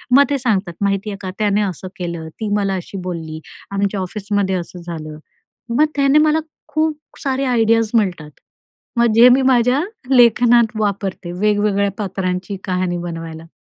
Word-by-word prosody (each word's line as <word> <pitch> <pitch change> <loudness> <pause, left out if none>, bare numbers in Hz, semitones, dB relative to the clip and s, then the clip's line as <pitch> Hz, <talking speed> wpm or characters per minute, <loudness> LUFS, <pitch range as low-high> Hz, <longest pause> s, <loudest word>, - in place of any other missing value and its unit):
मग 280 - +8
ते 285 - +1
सांगतात, 210 -8 0
माहिती 200 +1 0
आहे 200 - -5
का 190 - -5
त्याने 210 -1 +2
असं 190 -2 -3
केलं, 170 -4 -5
ती 220 - -2
मला 200 -2 0
अशी 185 +2 -6
बोलली, 160 -3 -5 0.3
आमच्या 200 0 -1
ऑफिसमध्ये 200 0 -1
असं 175 0 -6
झालं. 155 -3 -7 0.6
मग 300 - +5
त्याने 280 0 +4
मला 310 +1 +3 0.3
खूप 315 -1 0 0.3
सारे 270 0 0
आयडियाज 225 -3 +2
मिळतात. 185 -9 0 0.7
मग 235 -2 +3
जे 240 +2 +8
मी 255 +2 +5
माझ्या 255 +1 +3 0.3
लेखनात 235 -1 +5
वापरते, 195 -4 -2
वेगवेगळ्या 205 -1 +2
पात्रांची 190 -1 -3
कहाणी 180 -1 -1
बनवायला. 165 -1 -7
200 Hz, 150 wpm, -19 LUFS, 180-235 Hz, 0.7 s, मग